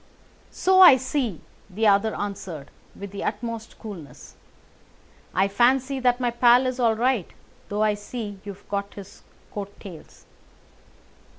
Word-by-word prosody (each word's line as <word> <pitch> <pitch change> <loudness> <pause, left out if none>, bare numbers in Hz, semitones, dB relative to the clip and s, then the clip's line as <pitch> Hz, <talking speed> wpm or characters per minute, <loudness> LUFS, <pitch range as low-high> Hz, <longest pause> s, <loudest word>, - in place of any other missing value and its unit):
"So 375 0 +2
I 350 -8 +10
see," 255 - -2 0.3
the 215 +4 -2
other 205 +1 +3
answered 185 -8 -6 0.2
with 200 -1 -8
the 200 - -6
utmost 230 +1 -5
coolness. 175 - -10 1.0
"I 190 +2 +2
fancy 260 +6 +2
that 250 -1 +2
my 245 -1 0
pal 240 +1 +5
is 255 0 -2
all 230 -2 +3
right, 240 -4 0 0.4
though 210 +1 0
I 215 -1 +3
see 205 -1 -7
you 200 -1 -6
have 200 - -24
got 200 0 -4
his 200 0 -11 0.3
coat 200 -1 -7
tails." 175 -6 -12
215 Hz, 140 wpm, -24 LUFS, 200-245 Hz, 1.0 s, I